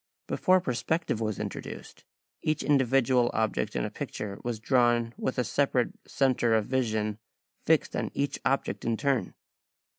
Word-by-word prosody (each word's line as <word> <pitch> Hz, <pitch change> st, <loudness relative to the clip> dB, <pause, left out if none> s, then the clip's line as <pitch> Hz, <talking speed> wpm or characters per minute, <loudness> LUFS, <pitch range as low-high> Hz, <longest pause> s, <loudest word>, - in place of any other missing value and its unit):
Before 185 Hz, 0 st, +3 dB
perspective 125 Hz, -2 st, -1 dB
was 110 Hz, -3 st, -2 dB
introduced, -, -, -7 dB, 0.4 s
each 155 Hz, -1 st, 0 dB
individual 130 Hz, -3 st, +3 dB
object 110 Hz, -1 st, 0 dB
in -, -, 0 dB
a -, -, -4 dB
picture 100 Hz, -1 st, -5 dB
was 120 Hz, -2 st, -3 dB
drawn 120 Hz, -1 st, +2 dB
with 130 Hz, -, -3 dB
a 125 Hz, -, +2 dB
separate 130 Hz, -2 st, +1 dB
centre 125 Hz, -4 st, +2 dB
of 110 Hz, -2 st, +2 dB
vision 110 Hz, -4 st, -1 dB, 0.5 s
fixed -, -, +3 dB
on -, -, -1 dB
each 140 Hz, 0 st, -1 dB
object 135 Hz, -, 0 dB
in 115 Hz, -1 st, 0 dB
turn. 135 Hz, -9 st, 0 dB
120 Hz, 145 wpm, -28 LUFS, 110-135 Hz, 0.5 s, Before